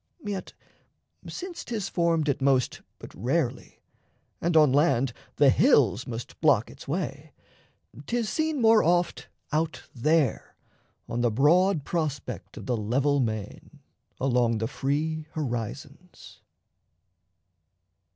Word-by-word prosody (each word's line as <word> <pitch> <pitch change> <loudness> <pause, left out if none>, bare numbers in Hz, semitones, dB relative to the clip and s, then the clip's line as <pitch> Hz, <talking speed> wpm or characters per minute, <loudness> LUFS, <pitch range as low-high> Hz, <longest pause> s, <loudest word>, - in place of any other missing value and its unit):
Yet 200 -2 -5 0.8
since 365 -1 -6
'tis 215 -5 -3
formed 170 -4 +1
At 140 -1 0
most 135 -2 +1 0.2
but - - -12
rarely, 130 - -2 0.6
and 170 -1 +2
on 150 -4 +6
land 135 -4 +2 0.2
the 140 -2 +5
hills 130 - +3
Must 115 -1 -7
block 140 -8 +3
its - - -13
way, 145 -2 -4 0.7
'tis 235 -2 -1
seen 315 +3 -1
more 225 -2 +6
oft 175 +1 +1 0.2
out 160 +1 -1
there 150 +1 +1 0.5
On 120 - -2
the 120 - +3
broad 155 - +3
prospect 155 -5 -4
of - - -8
the 125 - 0
level 135 +7 +1
main 110 +5 -4 0.4
Along 120 -3 +2
the 110 - -1
free 150 +5 -2
horizons. 120 -8 -6
145 Hz, 115 wpm, -27 LUFS, 125-170 Hz, 0.8 s, on